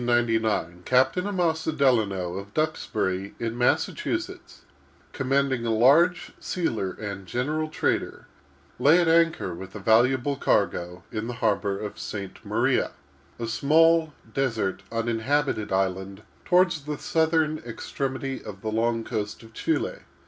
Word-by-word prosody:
In 120 - -3
the 120 - +3
year 120 -2 +3
1799, 90 -5 -2
Captain 130 - +2
Amasa 165 -5 0
Delano, 110 - +1
of 100 +1 -8
Duxbury, 105 -11 -1
in 115 -1 -2
Massachusetts, 120 0 -1 0.5
commanding 135 -2 0
a 115 - -1
large 145 +11 +4
sealer 115 - -2
and 100 -3 -7
general 150 - -1
trader, - - -1 0.5
lay 160 +5 +6
at 175 - +2
anchor 165 - +3
with 95 +3 -9
a - - -5
valuable 120 +6 +3
cargo, 90 -6 0
in 110 -1 -3
the 120 - -4
harbor 105 -4 0
of 105 0 -6
St. 100 -2 -6
Maria—a 70 +10 -2
small, 160 +6 +3 0.2
desert, 115 -8 -1
uninhabited 115 +1 0
island 95 +1 -1 0.2
toward 180 0 +4
the 150 -2 -4
southern 160 -1 +1
extremity 135 +3 -4
of 100 -2 -9
the 110 - -2
long 115 +1 0
coast 105 0 -4
of 115 0 -15
Chili. 330 - -1
120 Hz, 135 wpm, -26 LUFS, 100-150 Hz, 0.5 s, lay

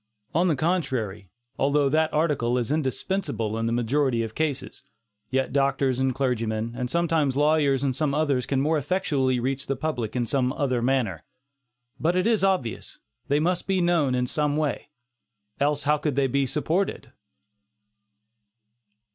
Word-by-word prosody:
On 175 +3 +3
the 160 - +2
contrary, 130 - -1 0.3
although 140 +1 +3
that 155 +3 +2
article 145 -6 +1
is 125 +1 -2
indispensable 145 - -1
in 115 0 -1
the - - 0
majority 120 +1 +1
of 110 -1 -6
cases, 140 -3 -3 0.5
yet 130 0 -1
doctors 135 -2 +1
and 130 -1 +1
clergymen, 115 -4 -1
and 125 -1 -3
sometimes 160 -4 +1
lawyers 145 -2 +3
and 135 -2 0
some 145 -1 0
others 145 -5 +1
can 135 - 0
more 155 +2 +2
effectually 140 -5 0
reach 135 +3 -2
the 140 - 0
public 125 -6 -3
in 120 -1 0
some 130 0 0
other 130 -5 0
manner. 120 -10 0 0.8
But 170 +3 +1
it 185 - +1
is 225 -3 +2
obvious, 185 - -1 0.3
they 145 +1 +2
must 175 +3 0
be 190 -1 +1
known 170 -7 +2
in 125 0 +1
some 150 +3 0
way, 155 -2 -2 0.7
else 145 +1 +1
how 150 +1 +3
could 145 -3 -1
they 140 0 +2
be 135 +1 +1
supported? 160 +7 -1
140 Hz, 155 wpm, -25 LUFS, 125-155 Hz, 0.8 s, On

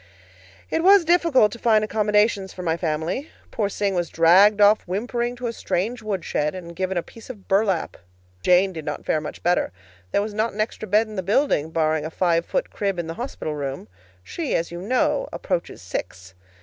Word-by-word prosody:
It 325 - 0
was 390 -1 +6
difficult 325 - +4
to 235 - -9
find 220 -2 +3
accommodations 210 -2 +1
for 180 - -7
my 165 -2 +1
family. 170 - -2 0.2
Poor 205 -3 -1
Sing 200 -1 -1
was 175 -2 -1
dragged 190 +6 +5
off 205 +1 +6
whimpering 240 +5 -2
to 245 0 -7
a 230 - -2
strange 225 +4 -2
woodshed, 190 -7 -2
and 170 -2 -8
given 185 +1 -2
a 170 - 0
piece 230 - -14
of 210 -7 -10
burlap. 195 -3 +1 0.4
Jane 180 - +4
did 160 -2 -6
not 150 -1 -5
fare 155 - +1
much 150 - -8
better. 175 - +1 0.4
There 200 - +2
was 210 0 -5
not 220 +1 -1
an 210 - -10
extra 215 0 -3
bed 215 +2 +3
in 215 -2 -10
the - - 0
building, 195 - +1
barring 155 -1 0
a 155 - -4
five 170 0 +1
foot - - -2
crib 195 -3 -2
in 175 - -2
the 165 - -5
hospital 235 - -5
room. 140 -2 -5 0.4
She, 320 - -3
as 170 +1 -1
you 175 0 -6
know, 255 - 0
approaches 170 - -3
six. 90 +1 -6
195 Hz, 200 wpm, -23 LUFS, 170-220 Hz, 0.4 s, was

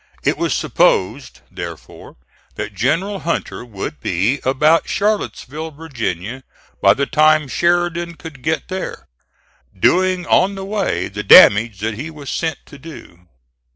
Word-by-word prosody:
It - - +1
was - - -2
supposed, - - 0
therefore, - - -9 0.4
that - - -5
General 175 - -1
Hunter 170 -7 -3
would 95 - -7
be 100 - 0
about 150 +5 +2
Charlottesville, 160 -7 -2
Virginia, 130 - -5 0.4
by - - +5
the 140 - 0
time 155 0 +3
Sheridan 170 +2 0
could 160 -5 -11
get 160 +4 -2
there, 190 0 -6 0.7
doing 185 - +2
on 195 +2 +2
the 190 0 -6
way 195 - -2
the 105 +1 -6
damage 105 +1 +7
that 110 +1 -2
he 140 +9 -6
was 150 -3 -8
sent 160 -3 -2
to 145 - -14
do. 90 - -13
150 Hz, 135 wpm, -18 LUFS, 120-170 Hz, 0.7 s, damage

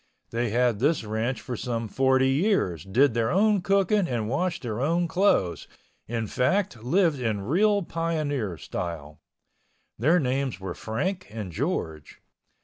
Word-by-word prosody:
They 120 0 -1
had 120 -1 +1
this 145 +2 +2
ranch 110 +3 -2
for 125 - -5
some 115 0 -3
forty 130 +3 +3
years, 135 - +1
did 125 +7 +3
their 115 -1 +1
own 205 +3 +3
cooking 195 +1 +2
and 115 -6 -2
washed 165 +9 -1
their 115 -2 -3 0.3
clothes, 170 - +1 0.4
in 115 0 -2
fact, 130 - 0
lived 160 +2 +2
in 110 -5 -1
real 200 - +2
pioneer 150 - -2
style. 75 -2 -6 0.8
Their 155 +10 +4
names 130 - -1
were 95 -2 -5
Frank 180 - -3
and 105 -5 -6
George. 80 - -3
125 Hz, 140 wpm, -26 LUFS, 110-170 Hz, 0.8 s, Their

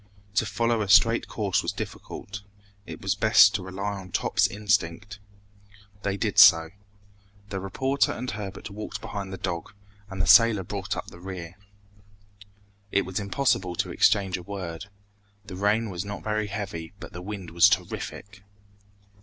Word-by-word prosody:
To 110 +1 +1
follow 115 +2 0
a 100 - -3
straight 115 +5 +5
course 100 -4 0
was - - -2
difficult. 100 +1 -7 0.5
It - - -9
was - - +1
best 100 - +6
to 105 - -1
rely 100 +2 -4
on 95 -1 -11
Top's - - +2
instinct. 100 -1 -1 0.8
They 100 0 -2
did - - +1
so. 80 0 +8 0.8
The 95 - -3
reporter 130 +9 0
and 125 +2 -4
Herbert 100 -1 -7
walked 105 +2 -6
behind 100 -2 -6
the 95 - -5
dog, 85 0 -4 0.4
and 95 -1 -7
the 95 - +2
sailor 110 +1 +6
brought 100 +1 -4
up - - -6
the 85 - -13
rear. 90 -2 -8 1.4
It 100 - +2
was 95 +1 -3
impossible 100 -3 0
to - - -2
exchange 95 -2 +2
a - - -8
word. 90 -1 -6 0.6
The 100 -3 -8
rain 105 +3 +1
was 90 -1 -4
not 100 0 -7
very 110 -1 -1
heavy, 95 -5 -6
but 90 +2 -10
the 90 - -7
wind 95 -1 -7
was 85 0 +6
terrific. 100 +1 -4
100 Hz, 160 wpm, -26 LUFS, 95-105 Hz, 1.4 s, so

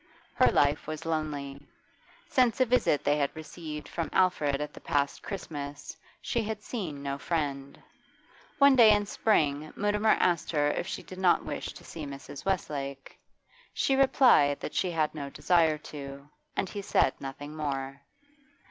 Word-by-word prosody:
Her - - +4
life 145 +1 +2
was 155 +1 -5
lonely; 145 -3 -3 0.7
since 250 -2 +2
a 255 - +5
visit 240 - +2
they 145 +1 +2
had 140 0 -1
received 155 -1 -7
from 165 -1 -3
Alfred 150 -7 +2
at 150 0 -4
the - - -11
past 145 -3 -1
Christmas 145 -7 -6 0.3
she 235 - 0
had 215 -1 -4
seen 165 - -5
no 140 0 -3
friend. 140 -4 -3 0.8
One 280 -1 +7
day 235 -4 +8
in 205 0 +1
spring 155 -8 +1
Mutimer 210 +1 +2
asked 175 -3 +1
her 145 -1 +2
if 175 - -3
she - - -5
did 185 - -10
not 185 -2 +3
wish - - -4
to - - -13
see 155 -3 -7
Mrs. 140 0 -9
Westlake; 140 -8 -3 0.6
she 270 - +2
replied 260 - +5
that - - -5
she 185 - 0
had 160 -3 0
no 145 -3 -5
desire 160 0 +2 0.2
to, 140 -1 -8 0.3
and 195 - 0
he 200 +2 -5
said 135 - +2
nothing 145 +2 -7
more. 135 -2 -4
155 Hz, 160 wpm, -29 LUFS, 140-190 Hz, 0.8 s, day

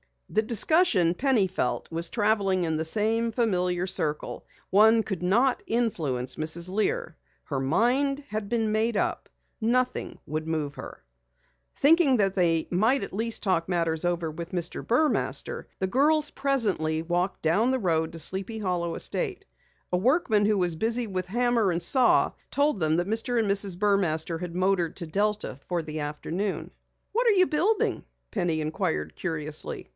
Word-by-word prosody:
The 215 - +2
discussion, 225 - +3
Penny 250 -1 +2
felt, 175 -9 -3
was 165 +1 +1
traveling 205 -4 +1
in 160 -2 -1
the 160 - -1
same 225 +5 +1
familiar 180 -6 0
circle. 155 -5 -2 0.2
One 220 +3 +5
could 195 -5 -5
not 235 +9 +2
influence 160 - -1
Mrs. 165 +3 +1
Lear. 460 - -1 0.3
Her 140 -4 -3
mind 255 - +1
had 215 -1 -4
been 225 -1 0
made 220 +1 0
up. - - -1 0.3
Nothing 250 +3 -1
would 155 +2 -4
move 150 -3 -2
her. - - -10 0.7
Thinking 290 -2 +4
that 195 -3 +1
they 165 -4 +1
might 225 +10 +2
at - - -7
least 225 +3 -2
talk 180 -4 +1
matters 165 -2 -1
over 170 -2 -1
with 170 +3 -8
Mr. 175 -1 -2
Burmaster, 290 +6 0
the 190 - 0
girls 295 +8 +2
presently 205 - 0
walked 175 +3 -2
down 195 +10 +2
the 260 - +1
road 165 -6 0
to - - -7
Sleepy 190 +7 -1
Hollow 180 -5 -2
estate. 415 -6 -2 0.5
A 180 - +2
workman 220 - +2
who 210 0 +2
was 175 -3 0
busy 230 +4 0
with 185 -2 -3
hammer 235 0 +1
and 170 0 -2
saw 255 -3 +4 0.2
told 285 -5 +1
them 155 -1 +1
that 175 +1 -1
Mr. 225 +3 -1
and 215 -3 +1
Mrs. 195 -2 +3
Burmaster 175 -5 0
had 175 -1 -6
motored 185 -3 0
to 175 - -3
Delta 205 -3 -2
for 175 -2 -2
the 155 0 -6
afternoon. 160 +7 -4 0.4
"What 475 +3 +1
are - - +6
you 370 -3 +4
building?" 360 +8 0 0.3
Penny 175 -5 -1
inquired 80 - -2
curiously. 155 - -3
195 Hz, 160 wpm, -26 LUFS, 165-230 Hz, 0.7 s, are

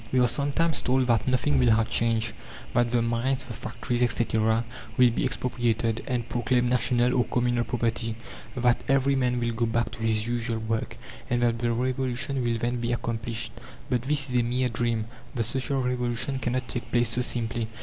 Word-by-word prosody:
We 130 - +3
are 125 - +5
sometimes 145 +5 +1
told 130 0 +2
that 115 -2 +2
"nothing 125 - +2
will 65 - +4
have 110 0 +2
changed": 115 -1 +1 0.4
that 120 0 +3
the 120 -1 +2
mines, 120 +3 0
the 120 - -7
factories, 120 +2 -3
etc., 115 -2 +2 0.3
will 125 -1 +6
be 115 - -1
expropriated, 120 -3 0
and 120 -2 -1
proclaimed 125 0 +1
national 125 0 +3
or 125 - +4
communal 120 -1 +1
property, 115 -1 -1 0.4
that 125 -1 +2
every 135 0 +3
man 125 -2 +1
will 120 0 0
go 115 +1 0
back 115 +1 0
to 115 - -10
his 110 -1 +1
usual 120 -1 -1
work, 110 0 -3 0.3
and 120 0 +1
that 115 -1 +2
the 120 0 +1
Revolution 130 +2 -1
will 120 -1 +1
then 120 +2 -1
be 120 0 -1
accomplished. 115 -1 -3 0.4
But 125 -2 +2
this 140 +2 +1
is 125 - -4
a - - +4
mere 125 +2 0
dream: 115 -1 -1 0.3
the 115 - +1
Social 130 +3 -1
Revolution 125 +1 -1
cannot 125 0 -1
take 120 - -5
place 120 -1 +2
so 120 +2 +1
simply. 115 -2 -2
120 Hz, 190 wpm, -27 LUFS, 115-125 Hz, 0.4 s, will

